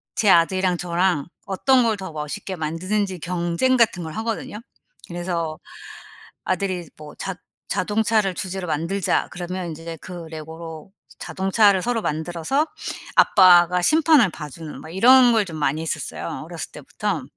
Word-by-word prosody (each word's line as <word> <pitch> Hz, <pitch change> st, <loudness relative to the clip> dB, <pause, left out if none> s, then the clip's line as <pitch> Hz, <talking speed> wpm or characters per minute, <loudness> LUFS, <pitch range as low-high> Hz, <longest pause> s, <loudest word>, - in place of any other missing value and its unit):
제 210 Hz, -, +2 dB
아들이랑 180 Hz, +2 st, +3 dB
저랑 175 Hz, -3 st, 0 dB, 0.2 s
어떤 250 Hz, +7 st, +3 dB
걸 225 Hz, -2 st, +2 dB
더 190 Hz, -3 st, -7 dB
멋있게 150 Hz, +5 st, -5 dB
만드는지 185 Hz, +5 st, -2 dB
경쟁 175 Hz, -, 0 dB
같은 220 Hz, -7 st, +2 dB
걸 160 Hz, -, -6 dB
하거든요. 220 Hz, 0 st, -4 dB, 0.5 s
그래서 170 Hz, -2 st, -3 dB, 0.9 s
아들이 185 Hz, -3 st, -2 dB
뭐 150 Hz, -1 st, -11 dB
"자 190 Hz, -, -5 dB, 0.3 s
자동차를 210 Hz, 0 st, +1 dB
주제로 190 Hz, 0 st, -4 dB
만들자." 165 Hz, +5 st, 0 dB
그러면 180 Hz, 0 st, -5 dB
인제 165 Hz, +1 st, -7 dB
그 175 Hz, -2 st, -8 dB
레고로 160 Hz, +2 st, -9 dB, 0.3 s
자동차를 195 Hz, 0 st, +2 dB
서로 235 Hz, 0 st, -1 dB
만들어서 170 Hz, -, -1 dB, 0.5 s
아빠가 180 Hz, -2 st, +6 dB
심판을 305 Hz, -, +5 dB
봐 150 Hz, -2 st, -8 dB
주는 155 Hz, +2 st, -9 dB
막 -, -, -10 dB
이런 245 Hz, +4 st, +7 dB
걸 220 Hz, -2 st, +3 dB
좀 170 Hz, -4 st, -8 dB
많이 150 Hz, +1 st, 0 dB
했었어요, 160 Hz, -, -4 dB
어렸을 -, -, -7 dB
때부터. -, -, -4 dB
180 Hz, 310 characters per minute, -22 LUFS, 165-205 Hz, 0.9 s, 이런